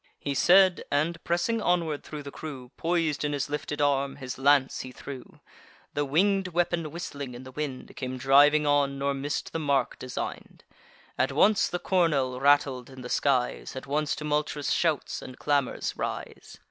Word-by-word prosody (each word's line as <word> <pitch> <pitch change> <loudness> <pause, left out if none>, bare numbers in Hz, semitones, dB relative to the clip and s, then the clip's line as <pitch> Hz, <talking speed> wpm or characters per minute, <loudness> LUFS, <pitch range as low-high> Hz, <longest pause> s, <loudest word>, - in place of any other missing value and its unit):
He 140 - -2
said; 185 +5 +5
and, 160 +4 0
pressing 175 +7 0
onward 170 -6 0
thro' 150 -1 -7
the 140 - -8
crew, 135 -6 -8
Pois'd 165 -3 0
in 145 0 -1
his 145 0 -2
lifted 150 0 -3
arm, 140 -1 +1
his 130 -1 -7
lance 140 -1 +3
he 130 - -6
threw. 130 0 -10 0.5
The 145 - 0
winged 190 +7 +2
weapon, 175 -2 0
whistling 145 -5 -6
in 125 - -9
the 130 - -10
wind, 140 -2 -5
Came 130 -1 -4
driving 145 +3 +5
on, 145 -1 +2
nor 140 +1 0
miss'd 140 +2 -3
the 165 - -1
mark 140 -4 0
design'd. 130 -1 -6 0.6
At 130 +2 +2
once 195 +9 +4
the 175 - -2
cornel 150 -9 +1
rattled 140 -3 +3
in 130 -1 -11
the 125 - -7
skies; 130 -2 0
At 130 - -6
once 150 +1 0
tumultuous 150 -1 -1
shouts 160 -5 0
and 130 - -10
clamours 140 -3 0
rise. - - -6
145 Hz, 170 wpm, -27 LUFS, 135-160 Hz, 0.6 s, said